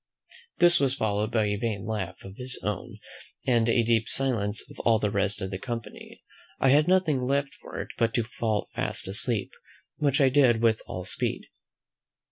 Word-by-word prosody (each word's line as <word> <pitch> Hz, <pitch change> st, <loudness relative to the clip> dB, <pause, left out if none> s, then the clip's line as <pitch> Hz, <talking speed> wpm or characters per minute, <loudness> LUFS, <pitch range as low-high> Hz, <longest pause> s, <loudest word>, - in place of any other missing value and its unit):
This 175 Hz, 0 st, +6 dB
was 135 Hz, -2 st, +1 dB
followed 105 Hz, -2 st, -1 dB
by 110 Hz, -2 st, +2 dB
a 105 Hz, 0 st, -1 dB
vain 105 Hz, -3 st, -3 dB
laugh 95 Hz, -5 st, -4 dB
of 95 Hz, 0 st, -10 dB
his 130 Hz, 0 st, -4 dB
own, 105 Hz, -3 st, -4 dB, 0.5 s
and 120 Hz, -3 st, +2 dB
a 115 Hz, 0 st, +3 dB
deep 115 Hz, -1 st, +1 dB
silence 115 Hz, -6 st, 0 dB
of -, -, -14 dB
all 115 Hz, -1 st, +3 dB
the 105 Hz, -1 st, -1 dB
rest 100 Hz, +1 st, 0 dB
of 95 Hz, 0 st, -4 dB
the 95 Hz, -, -4 dB
company. 115 Hz, +1 st, -7 dB, 0.4 s
I 135 Hz, -, +3 dB
had 150 Hz, +4 st, +5 dB
nothing 180 Hz, -7 st, +2 dB
left 140 Hz, +2 st, 0 dB
for -, -, -9 dB
it -, -, -5 dB
but 115 Hz, -1 st, +2 dB
to 120 Hz, -, +2 dB
fall 110 Hz, -1 st, -2 dB
fast -, -, -2 dB
asleep, 110 Hz, +3 st, 0 dB, 0.5 s
which 145 Hz, 0 st, +1 dB
I 135 Hz, -2 st, +5 dB
did 130 Hz, -4 st, +4 dB
with 110 Hz, -1 st, +3 dB
all 90 Hz, 0 st, -6 dB
speed. 95 Hz, -, -2 dB
115 Hz, 185 wpm, -27 LUFS, 105-130 Hz, 0.5 s, This